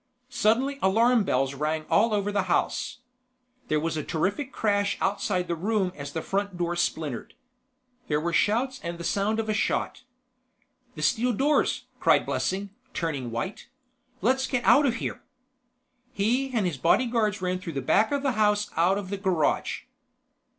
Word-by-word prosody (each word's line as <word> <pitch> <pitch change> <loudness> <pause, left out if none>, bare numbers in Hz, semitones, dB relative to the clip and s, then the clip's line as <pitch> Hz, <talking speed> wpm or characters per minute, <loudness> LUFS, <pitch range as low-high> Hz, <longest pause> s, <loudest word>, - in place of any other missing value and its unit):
Suddenly 260 +4 +1
alarm 225 +3 +4
bells 135 -1 +1
rang 155 +2 -2
all 225 +2 +3
over 205 -1 0
the 200 -1 0
house. 250 0 0 0.7
There 155 - +1
was 160 +1 -2
a 155 - -2
terrific 200 - -2
crash 205 -2 0
outside 195 -2 0
the - - -1
room 195 +1 0
as 140 -1 -7
the 160 +1 -4
front 200 -1 -2
door 175 0 -1
splintered. 155 -7 -2 0.7
There 150 -1 +1
were 170 +2 -2
shouts 255 +8 +1
and 170 0 -5
the 170 - -7
sound 205 +5 0
of 220 - -2
a 215 - +1
shot. 210 - -1 0.9
"The - - -5
steel 245 0 +2
doors!" 285 +7 +1
cried - - +4
Blessing, 195 +1 -2 0.2
turning 145 -7 -2
white. 115 - -5 0.5
"Let's 260 +2 +2
get 250 -3 -1
out 285 0 +6
of 235 - +1
here." - - -4 0.9
He 250 +5 0
and 225 -6 0
his 170 -6 -2
bodyguards 215 - +2
ran 180 0 -1
through 180 -3 -6
the 140 - -2
back 215 - +3
of 285 -1 0
the 275 - +2
house 210 -2 +1
out 175 +4 +3
of 200 -2 -6
the 200 - -2
garage. 185 -6 0
200 Hz, 165 wpm, -26 LUFS, 170-230 Hz, 0.9 s, out